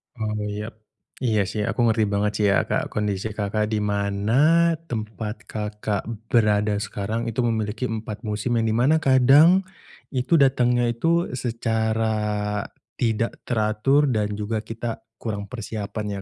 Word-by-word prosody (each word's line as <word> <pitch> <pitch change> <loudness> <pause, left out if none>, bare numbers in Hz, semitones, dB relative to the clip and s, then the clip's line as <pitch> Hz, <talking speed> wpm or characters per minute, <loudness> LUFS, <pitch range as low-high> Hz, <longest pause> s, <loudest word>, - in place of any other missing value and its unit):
Oh 110 -2 -3
iya. 105 +2 -5 0.5
Iya 110 -5 +1
sih 105 -1 -2
aku 120 +1 -1
ngerti 110 -1 +2
banget 105 0 0
sih 105 - +2
ya - - +4
Kak, - - -1
kondisi 105 0 -2
Kakak, 105 +1 -1
di 105 - +1
mana 105 +12 +2
tempat 110 -3 -5
Kakak 105 -1 -3 0.2
berada 105 -2 +3
sekarang 105 +2 -3
itu 115 +2 -1
memiliki 115 +1 -1
4 110 -1 -5
musim, 105 +1 -2
yang 115 -1 +1
di - - +1
mana 150 +6 +3
kadang 145 +8 +6 0.5
itu 130 +6 +2
datangnya 125 -3 +3
itu 165 +8 +1
secara 110 -3 -1 0.4
tidak 115 -1 +1 0.2
teratur, 115 +6 +2
dan 105 -1 -1
juga 110 +1 -2
kita 115 +1 -5 0.2
kurang 100 -3 -5
persiapan 105 -3 -5
110 Hz, 135 wpm, -24 LUFS, 105-120 Hz, 0.5 s, kadang